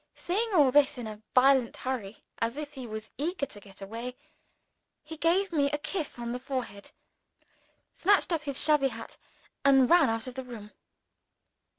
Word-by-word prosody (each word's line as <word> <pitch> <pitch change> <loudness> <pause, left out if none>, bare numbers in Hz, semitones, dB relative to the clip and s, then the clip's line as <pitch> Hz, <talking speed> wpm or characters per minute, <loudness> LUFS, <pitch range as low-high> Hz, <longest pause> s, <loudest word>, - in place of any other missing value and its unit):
Saying 425 +6 -1
all 285 -6 +6
this 285 -1 +4
in 245 - -5
a 215 -1 -8
violent 260 -1 +4
hurry, 230 -6 -5 0.2
as 230 +4 -1
if 295 -1 -6
he 260 -2 -7
was 215 -1 -7
eager 320 0 -1
to 210 - -10
get 195 -1 -15
away, 235 +5 -6 0.9
he 315 +2 -8
gave 345 +5 +2
me 285 -4 +2
a 295 - -1
kiss 310 -1 -4
on 235 0 -4
the 250 - -3
forehead, 250 -7 -5 1.0
snatched 395 0 +3
up 325 - 0
his 280 -2 0
shabby 300 -3 +4
hat, - - -8 0.5
and 270 -1 +5
ran 345 -7 +6
out 225 0 -2
of 255 - -6
the 260 +1 -5
room. 220 -4 -10
265 Hz, 175 wpm, -29 LUFS, 230-300 Hz, 1.0 s, all